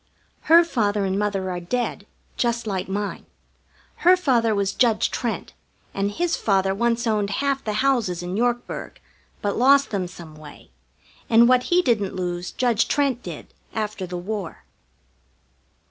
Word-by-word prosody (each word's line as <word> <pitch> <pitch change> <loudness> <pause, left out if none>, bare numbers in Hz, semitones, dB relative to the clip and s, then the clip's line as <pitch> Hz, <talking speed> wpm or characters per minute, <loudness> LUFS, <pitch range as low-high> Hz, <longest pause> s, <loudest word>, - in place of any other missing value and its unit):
Her 335 +1 +8
father 210 -10 0
and 190 +1 -1
mother 195 -3 -1
are 180 - -3
dead, 240 +8 -3 0.3
just 235 -1 -1
like 190 -3 -3
mine. 205 +1 -4 0.7
Her 360 +2 +5
father 235 -10 +2
was 200 -1 0
Judge 230 -4 +2
Trent, 235 -2 -3 0.4
and 195 +1 -1
his 340 +10 -1
father 195 -2 +1
once 235 +3 0
owned 210 -3 0
half 275 +5 -1
the 215 - -2
houses 215 -11 +1
in 180 +1 -4
Yorkburg, 240 +2 -2 0.4
but 205 -1 -1
lost 275 +3 +5
them 190 -4 -1
some 170 -3 -12
way, 155 - -14 0.6
and 230 +1 +6
what 255 0 +3
he 360 +1 +4
didn't 215 - 0
lose 175 -1 -3
Judge 240 -3 +1
Trent 275 -4 0
did - - -9 0.2
after 210 -4 -3
the 180 0 -5
war. 195 0 -5
215 Hz, 150 wpm, -23 LUFS, 190-245 Hz, 0.7 s, Her